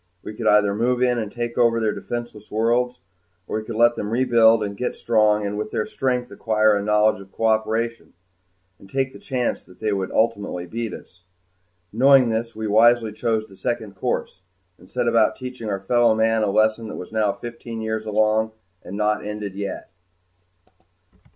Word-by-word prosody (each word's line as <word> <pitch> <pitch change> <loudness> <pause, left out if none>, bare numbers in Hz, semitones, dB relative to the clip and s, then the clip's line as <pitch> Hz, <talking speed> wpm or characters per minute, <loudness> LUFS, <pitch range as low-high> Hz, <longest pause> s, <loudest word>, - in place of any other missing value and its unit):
We 105 - -7
could - - -3
either 105 -1 +4
move 125 +4 +1
in 125 -1 +2
and 110 -2 -4
take 120 0 -4
over 115 -1 +4
their 110 -2 +1
defenseless 120 -3 -6
worlds, 120 +2 0 0.5
or - - -2
we - - -7
could 115 0 -6
let 120 +1 +4
them 105 - -4
rebuild 115 -2 +4
and 100 -1 -4
get 125 +4 -3
strong, 105 -2 +2
and 105 +1 -3
with 105 0 -3
their 105 - -2
strength 125 -2 -2
acquire 110 -1 +2
a 100 - 0
knowledge 105 0 +2
of 95 0 -15
cooperation 110 +1 -1 0.7
and 95 - -16
take 135 +1 -1
the - - -11
chance 125 -3 -2
that 90 - -19
they 110 -1 0
would 95 -1 -2
ultimately 100 -5 0
beat 115 +5 -4
us. 90 +1 -12 0.7
Knowing 130 +1 +5
this, 115 +1 -2
we 110 0 -4
wisely 115 +1 +4
chose 110 -1 -1
the 100 - -16
second 110 -2 -4
course 95 - -3 0.4
and 90 - -18
set 125 -1 -1
about 115 -2 +3
teaching 125 -3 -7
our 100 -1 -2
fellow 115 +3 +3
men 110 0 +2
a 105 - +1
lesson 110 +2 +2
that - - -7
was 90 - -8
now 110 -2 +1
fifteen 115 0 -8
years 110 0 -3
along 110 +1 +1 0.3
and 100 - -8
not 105 0 0
ended 105 -1 -5
yet. 100 -1 -6
110 Hz, 185 wpm, -22 LUFS, 105-120 Hz, 0.7 s, Knowing